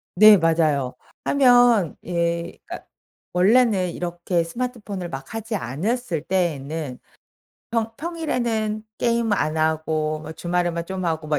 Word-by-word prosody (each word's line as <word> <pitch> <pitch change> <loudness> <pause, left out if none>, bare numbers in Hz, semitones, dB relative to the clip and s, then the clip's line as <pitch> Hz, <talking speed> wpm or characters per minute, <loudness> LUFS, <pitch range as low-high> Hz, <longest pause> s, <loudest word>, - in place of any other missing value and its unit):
네 215 +3 +9
맞아요 155 -6 +1 0.3
하면 245 - +4
예 170 0 -2
그러니까 - - -8 0.5
원래는 195 0 +3
이렇게 175 0 -2
스마트폰을 205 -1 -5
막 135 +4 -8
하지 225 0 -4
않았을 180 - -2
때에는 155 -6 -2 0.7
평 225 -1 -1
평일에는 240 -10 -2 0.2
게임 235 -2 +1
안 155 -5 0
하고 155 -1 0
뭐 155 +1 -8
주말에만 175 0 -1
좀 185 0 -4
하고 160 -1 -2
막 150 -1 +1
175 Hz, 265 characters per minute, -23 LUFS, 160-225 Hz, 0.7 s, 네